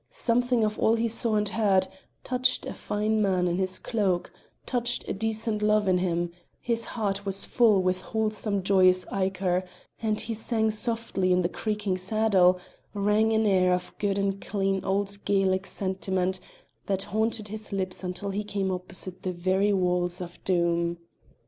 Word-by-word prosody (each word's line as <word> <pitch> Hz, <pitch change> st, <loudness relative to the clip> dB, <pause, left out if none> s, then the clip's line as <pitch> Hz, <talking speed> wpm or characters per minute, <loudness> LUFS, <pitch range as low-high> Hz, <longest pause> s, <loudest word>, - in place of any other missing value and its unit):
Something 245 Hz, 0 st, +1 dB
of 215 Hz, 0 st, -1 dB
all 225 Hz, -, +3 dB
he 230 Hz, 0 st, 0 dB
saw 230 Hz, 0 st, +1 dB
and 210 Hz, 0 st, +1 dB
heard 200 Hz, -3 st, +2 dB, 0.4 s
touched 255 Hz, 0 st, 0 dB
a -, -, -5 dB
fine 215 Hz, +1 st, -1 dB
man 185 Hz, -3 st, +2 dB
in 175 Hz, 0 st, 0 dB
his 185 Hz, -1 st, +1 dB
cloak, 195 Hz, -6 st, -1 dB, 0.3 s
touched 245 Hz, -1 st, -1 dB
a -, -, -2 dB
decent 220 Hz, +1 st, -1 dB
love 210 Hz, -1 st, +2 dB
in 185 Hz, -1 st, +3 dB
him; 175 Hz, -1 st, -1 dB, 0.3 s
his 230 Hz, -1 st, 0 dB
heart 200 Hz, -3 st, -2 dB
was 195 Hz, -1 st, +3 dB
full 215 Hz, -6 st, +3 dB
with 185 Hz, 0 st, 0 dB
wholesome 215 Hz, -2 st, 0 dB
joyous 185 Hz, -1 st, +4 dB
ichor; 190 Hz, -1 st, 0 dB, 0.4 s
and 215 Hz, -1 st, 0 dB
he 230 Hz, -, -2 dB
sang 220 Hz, 0 st, +1 dB
softly 215 Hz, -4 st, 0 dB
to 180 Hz, -, +2 dB
the 170 Hz, -, 0 dB
creaking 210 Hz, -2 st, -2 dB
saddle, 185 Hz, -2 st, +3 dB, 0.4 s
sang 210 Hz, +2 st, +2 dB
an 220 Hz, 0 st, +2 dB
air 185 Hz, -3 st, +3 dB
of 180 Hz, -, -6 dB
good 200 Hz, -1 st, 0 dB
and 195 Hz, 0 st, -1 dB
clean 195 Hz, -2 st, -1 dB
old 200 Hz, +1 st, -1 dB
Gaelic 195 Hz, -1 st, +1 dB
sentiment 190 Hz, -1 st, -1 dB, 0.5 s
that 195 Hz, -1 st, 0 dB
haunted 220 Hz, -1 st, 0 dB
his 215 Hz, +1 st, -5 dB
lips 190 Hz, -1 st, -2 dB
until 185 Hz, +2 st, -3 dB
he 205 Hz, +2 st, -2 dB
came 200 Hz, -2 st, -2 dB
opposite 180 Hz, 0 st, -4 dB
the 185 Hz, -, -2 dB
very 190 Hz, +3 st, +1 dB
walls 180 Hz, -2 st, +1 dB
of 175 Hz, -1 st, -9 dB
Doom. 170 Hz, -1 st, +1 dB
195 Hz, 165 wpm, -27 LUFS, 185-215 Hz, 0.5 s, joyous